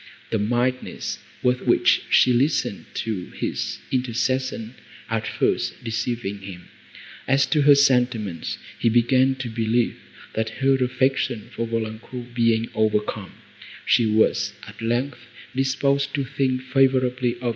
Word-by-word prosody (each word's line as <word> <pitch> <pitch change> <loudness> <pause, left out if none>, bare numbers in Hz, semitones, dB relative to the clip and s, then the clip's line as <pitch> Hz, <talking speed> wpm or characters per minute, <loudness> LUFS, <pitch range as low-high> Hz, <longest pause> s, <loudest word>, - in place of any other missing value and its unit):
The 110 - +1
mildness, 120 +4 -1 0.2
with 125 0 +1
which - - +4
she 125 - +5
listened 125 -4 +1
to 105 -5 -3
his - - -2
intercessions 125 -1 -1 0.4
at - - -1
first, - - 0
deceiving 115 -3 -3
him, 95 -2 -10 0.6
as 135 +1 +4
to 150 - +1
her 145 0 +7
sentiments, 125 - +1 0.2
he 115 - +3
began 130 +3 +3
to 130 -2 -5
believe, 115 +1 0 0.4
that, 110 0 -1
her 135 0 +3
affection 130 -2 0
for 115 - -2
Valancourt 115 +2 -5
being 115 -1 +2
overcome, 105 -2 -1 0.5
she 120 -2 +4
was, 110 -1 +2
at 105 +2 -11
length, 120 +2 -2 0.3
disposed 140 +1 +1
to 140 -2 -1
think 130 -1 -1
favourably 130 -2 +2
of 120 - -14
M. 120 - +1
120 Hz, 130 wpm, -23 LUFS, 110-130 Hz, 0.6 s, her